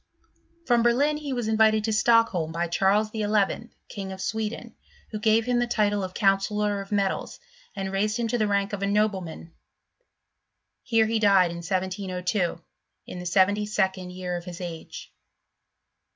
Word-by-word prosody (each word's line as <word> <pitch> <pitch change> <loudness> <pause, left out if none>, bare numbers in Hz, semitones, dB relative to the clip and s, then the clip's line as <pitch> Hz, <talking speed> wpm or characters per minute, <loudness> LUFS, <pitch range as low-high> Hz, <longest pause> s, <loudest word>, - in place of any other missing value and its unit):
From 240 -2 +3
Berlin 275 +6 +2
he 295 -2 -6
was 245 -4 -2
invited 220 -1 +3
to 220 0 0
Stockholm 215 -7 +3
by 170 +1 -1
Charles 200 +5 +2
XI., 215 +1 0 0.2
King 195 -2 -6
of 190 - -8
Sweden, 220 +3 -4 0.4
who 215 - -4
gave 220 +1 +3
him 245 -1 +1
the 240 - 0
title 205 -3 +1
of 185 0 -6
counsellor 205 0 +1
of 195 - -11
metals; 200 -2 -1 0.4
and 195 -1 -4
raised 210 +2 0
him 235 -1 -1
to 245 - 0
the 215 - +2
rank 200 0 0
of 200 - -3
a 200 - 0
nobleman: 195 -5 -1 1.3
here 225 -2 +2
he 225 0 0
died, 195 -4 +4
in 170 - -6
1702, 185 0 -2 0.5
in 180 - -8
the 180 - -5
seventy 200 +3 +2
second 190 -3 -1
year 180 -1 -4
of 175 0 -6
his 175 -2 -8
age. 170 -3 -8
205 Hz, 165 wpm, -26 LUFS, 185-220 Hz, 1.3 s, died